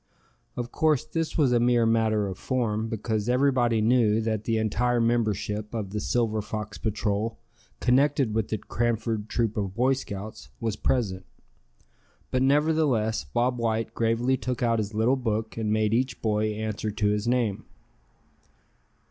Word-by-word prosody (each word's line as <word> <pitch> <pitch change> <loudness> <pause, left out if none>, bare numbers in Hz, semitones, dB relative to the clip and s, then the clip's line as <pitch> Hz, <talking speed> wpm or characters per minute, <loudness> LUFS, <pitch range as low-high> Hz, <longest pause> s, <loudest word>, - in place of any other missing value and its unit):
Of 120 -1 -4
course 155 -2 +2
this 165 0 -3
was 140 -6 +3
a 120 - +4
mere 120 -1 +3
matter 110 -2 +2
of 95 -2 -5
form, 115 -4 -1
because 110 0 -2
everybody 125 -3 +2
knew 110 -1 +3
that 110 -1 -2
the 115 -1 +1
entire 120 +3 +1
membership 110 -2 0
of 105 -4 -3
the 105 - -2
Silver 110 0 0
Fox 105 -1 -6
Patrol, 110 +1 -1 0.4
connected 135 -1 +2
with 110 -1 0
the 110 - -2
Cranford 115 -1 -2
Troop 115 -2 0
of 100 -2 -2
Boy 130 +3 +3
Scouts, 110 -5 -7
was 110 -2 -2
present. 100 -6 -1 1.0
But 130 - +1
nevertheless 140 -5 +2
Bob 125 +1 0
White 115 -1 -1
gravely 115 +3 +1
took 125 -2 -3
out 115 -1 +2
his 105 0 -3
little 115 +5 +2
book, 110 -3 -2
and 110 -2 -2
made 110 0 +2
each 130 +3 0
boy 110 -1 +1
answer 110 0 -3
to 105 0 0
his 105 +2 -1
name. 120 -5 0
115 Hz, 155 wpm, -26 LUFS, 105-125 Hz, 1.0 s, a